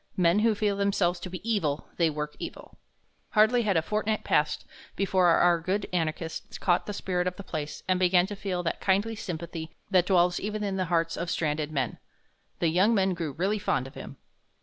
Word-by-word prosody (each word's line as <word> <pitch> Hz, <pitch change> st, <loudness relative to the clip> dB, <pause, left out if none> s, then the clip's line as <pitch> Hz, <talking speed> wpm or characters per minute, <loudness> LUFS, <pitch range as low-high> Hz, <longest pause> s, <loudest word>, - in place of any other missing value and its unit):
Men 175 Hz, +2 st, +4 dB
who 220 Hz, 0 st, +3 dB
feel 205 Hz, -1 st, 0 dB
themselves 195 Hz, -3 st, +1 dB
to 185 Hz, -, -6 dB
be 185 Hz, +4 st, -7 dB
evil, 160 Hz, -10 st, 0 dB
they 170 Hz, -2 st, +3 dB
work 150 Hz, 0 st, -4 dB
evil. -, -, -8 dB, 0.5 s
Hardly 220 Hz, +3 st, +5 dB
had 200 Hz, -6 st, +1 dB
a 160 Hz, -, +2 dB
fortnight 215 Hz, +3 st, -1 dB
passed 150 Hz, 0 st, +1 dB, 0.3 s
before 185 Hz, -2 st, +2 dB
our 170 Hz, 0 st, +4 dB
good 190 Hz, +5 st, -1 dB
anarchist 160 Hz, -1 st, -3 dB
caught 175 Hz, -1 st, +1 dB
the -, -, -2 dB
spirit 180 Hz, -2 st, -1 dB
of 180 Hz, -, -2 dB
the 200 Hz, -, -8 dB
place 155 Hz, -4 st, -5 dB
and 185 Hz, -1 st, +2 dB
began 180 Hz, -1 st, +4 dB
to 205 Hz, +1 st, -6 dB
feel 185 Hz, -3 st, -3 dB
that 165 Hz, -, -2 dB
kindly 200 Hz, +4 st, +2 dB
sympathy 170 Hz, -5 st, -6 dB, 0.2 s
that 180 Hz, -2 st, +4 dB
dwells 180 Hz, -2 st, +3 dB
even 210 Hz, +1 st, -3 dB
in 195 Hz, -2 st, -1 dB
the 185 Hz, -, 0 dB
hearts 165 Hz, -1 st, 0 dB
of 170 Hz, 0 st, -3 dB
stranded 155 Hz, -2 st, -1 dB
men. 135 Hz, -6 st, -2 dB, 0.6 s
The 170 Hz, -, +1 dB
young 190 Hz, +8 st, +3 dB
men 190 Hz, -2 st, +2 dB
grew 165 Hz, -5 st, -4 dB
really 195 Hz, +8 st, 0 dB
fond 135 Hz, -10 st, 0 dB
of 135 Hz, -, -10 dB
him. -, -, -9 dB
180 Hz, 200 wpm, -28 LUFS, 165-200 Hz, 0.6 s, Hardly